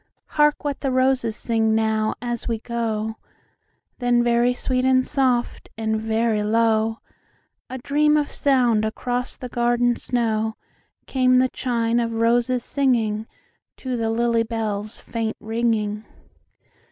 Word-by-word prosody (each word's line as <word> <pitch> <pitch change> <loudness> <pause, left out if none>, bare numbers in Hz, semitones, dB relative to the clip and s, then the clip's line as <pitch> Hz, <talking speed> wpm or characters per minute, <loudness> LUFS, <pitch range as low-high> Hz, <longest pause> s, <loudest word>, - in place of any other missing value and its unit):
"Hark 295 0 +2
what 285 -2 -2
the 275 - -1
roses 255 -3 +1
sing 225 -2 +1
now, 220 -1 +1
as 240 -1 -3
we 230 -2 0
go;"Then 235 +2 -4
very 240 +1 +3
sweet 255 +1 -1
and 260 0 +3
soft, 255 -3 0
and 220 -1 -1
very 220 -1 0
low,—A 225 +3 -2
dream 300 +3 +2
of 295 -1 -1
sound 245 -6 +2
across 245 +3 -3
the 250 - -6
garden 240 0 +1
snow,—Came 235 +3 -1
the 255 0 +3
chime 235 -2 0
of 230 -1 -1
roses 240 +2 +2
singingTo 230 -6 0 0.7
the 225 -1 -1
lily 230 0 +1
bell's 220 -2 -3
faint 225 -1 -4
ringing. 220 -2 -1
235 Hz, 115 wpm, -22 LUFS, 220-250 Hz, 0.7 s, very